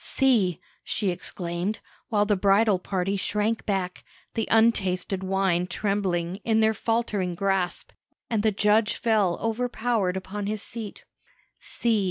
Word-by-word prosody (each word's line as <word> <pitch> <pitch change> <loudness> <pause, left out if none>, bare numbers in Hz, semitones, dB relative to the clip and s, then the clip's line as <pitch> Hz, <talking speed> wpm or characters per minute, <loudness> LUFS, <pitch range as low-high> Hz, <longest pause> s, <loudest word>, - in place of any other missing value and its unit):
"See!" 220 - +2 0.2
she 200 -3 -1
exclaimed, 175 +2 -3 0.3
while 210 -2 +2
the 205 0 +2
bridal 200 +1 +3
party 195 +1 -1
shrank 210 +3 -1
back, 190 -3 -2 0.3
the 225 - -1
untasted 195 -4 +2
wine 190 -2 +1
trembling 185 -2 -1
in 220 +1 +1
their 220 0 +4
faltering 215 -5 -1
grasp, 190 -2 -1 0.4
and 225 -3 0
the 220 - +3
judge 210 +2 +3
fell 210 -6 +2
overpowered 225 -4 0
upon 200 +2 -5
his 215 0 -3
seat 225 -3 -8 0.6
"see! 230 -2 0
205 Hz, 130 wpm, -26 LUFS, 185-220 Hz, 0.6 s, their